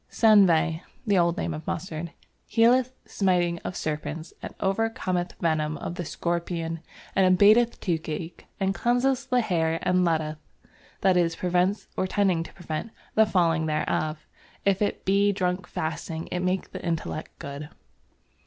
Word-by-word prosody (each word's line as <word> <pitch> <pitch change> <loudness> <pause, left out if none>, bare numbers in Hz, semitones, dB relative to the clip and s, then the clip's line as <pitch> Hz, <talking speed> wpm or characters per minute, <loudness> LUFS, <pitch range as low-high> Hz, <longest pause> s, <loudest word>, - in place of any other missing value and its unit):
"Senvey" 175 -7 +4 0.2
(the 200 -4 +3
old 170 +1 +2
name 170 - -2
of 155 +1 -7
mustard) 165 -1 -4 0.4
"healeth 245 +3 +4
smiting 175 -3 +1
of 180 - -6
Serpents 155 +1 -4
and - - -6
overcometh 190 -3 -1
venom 155 -2 0
of - - -5
the 175 - -4
Scorpions 170 0 -2 0.4
and 185 -1 +5
abateth 225 +3 +5
Toothache 165 -1 -4
and 195 0 +1
cleanseth 250 +6 +1
the 250 -2 +3
Hair 165 -6 +1
and 180 0 +3
letteth" 155 -2 0 0.6
(that 190 -1 +4
is, 165 -1 +2
prevents 180 +4 0
or 185 - 0
tends 185 -4 +1
to - - -19
prevent) 170 +2 -4 0.2
"the 220 0 +5
falling 165 -5 +2
thereof. 155 0 -1 0.4
If 195 0 +2
it 205 - -1
be 200 +1 +4
drunk 180 -2 -1
fasting, 160 +1 -4
it 180 - -1
makes 185 +1 -1
the - - -8
Intellect 165 -2 -3
good." 140 +1 -7
175 Hz, 145 wpm, -26 LUFS, 165-195 Hz, 0.6 s, and